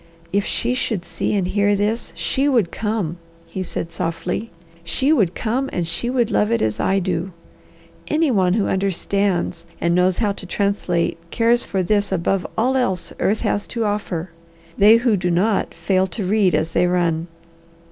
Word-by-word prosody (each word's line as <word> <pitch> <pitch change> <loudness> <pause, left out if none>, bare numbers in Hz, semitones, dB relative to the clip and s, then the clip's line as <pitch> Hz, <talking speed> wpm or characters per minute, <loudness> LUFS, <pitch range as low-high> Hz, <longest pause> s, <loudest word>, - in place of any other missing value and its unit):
"If 200 0 +2
she 245 +2 -1
could 220 -8 -1
see - - -2
and 195 -3 +1
hear 205 +1 +2
this, 210 +3 -1
she 275 +2 0
would 235 -10 +2
come," 210 -6 -2 0.3
he 190 - -6
said 170 -2 -4
softly. 170 +8 -3 0.3
"She 260 - +1
would 195 - +2
come 255 +4 -1
and 170 -2 -2
she 175 +9 -2
would 245 -3 +1
love 210 +2 +2
it 230 - +2
as 110 -1 -1
I 195 - +2
do. 180 -1 -2 0.7
Any 305 -1 +2
one 185 -5 +3
who 210 0 +1
understands, 190 -2 -1
and 170 0 +1
knows 180 +1 +3
how 210 -3 +1
to 195 -2 -7
translate, 180 -4 0
cares 235 +3 +2
for 190 -2 -1
this 205 +2 +1
above 190 +1 0
all 250 +4 +2
else 190 -10 0
earth 215 +2 +1
has 205 - -1
to 230 -2 -2
offer. 190 -4 -2 0.4
They 210 +3 +7
who 235 -2 +2
do 180 -2 -1
not, 195 +5 +1
fail 185 +3 +1
to 190 +2 -4
read 195 -1 +3
as 160 +1 0
they 180 - +2
run!" 170 -2 0
195 Hz, 180 wpm, -21 LUFS, 175-220 Hz, 0.7 s, They